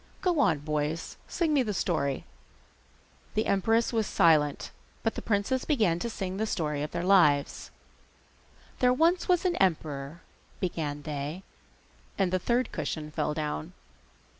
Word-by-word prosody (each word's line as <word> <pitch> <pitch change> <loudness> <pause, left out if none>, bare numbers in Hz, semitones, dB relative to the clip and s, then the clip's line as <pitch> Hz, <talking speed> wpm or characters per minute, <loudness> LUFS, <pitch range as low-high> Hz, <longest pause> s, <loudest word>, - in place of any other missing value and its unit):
Go 355 -4 +1
on, 180 - +4
boys, 150 +2 -3
sing 325 -3 0
me 285 - +4
the 210 -5 -2
story.' 140 -7 -1 1.1
The 215 - +1
empress 225 +5 +2
was 220 -3 +1
silent, 150 -3 +3 0.3
but 225 - +1
the - - -5
princes 230 +5 0
began 215 - +2
to 235 - -3
sing 190 -4 -4
the 220 +2 -1
story 150 -7 -1
of 150 - -2
their - - -3
lives. 170 -7 +3 1.1
'There 250 0 +4
was 335 +7 +2
once 360 0 +3
an 360 - +1
emperor,' 155 -4 -1 0.4
began 150 -5 -3
they, 150 +5 -4 0.7
and 190 -2 +1
the 185 - +2
third 240 +7 0
cushion 155 -1 -4
fell 150 0 -1
down. 150 - -3
180 Hz, 145 wpm, -28 LUFS, 150-225 Hz, 1.1 s, on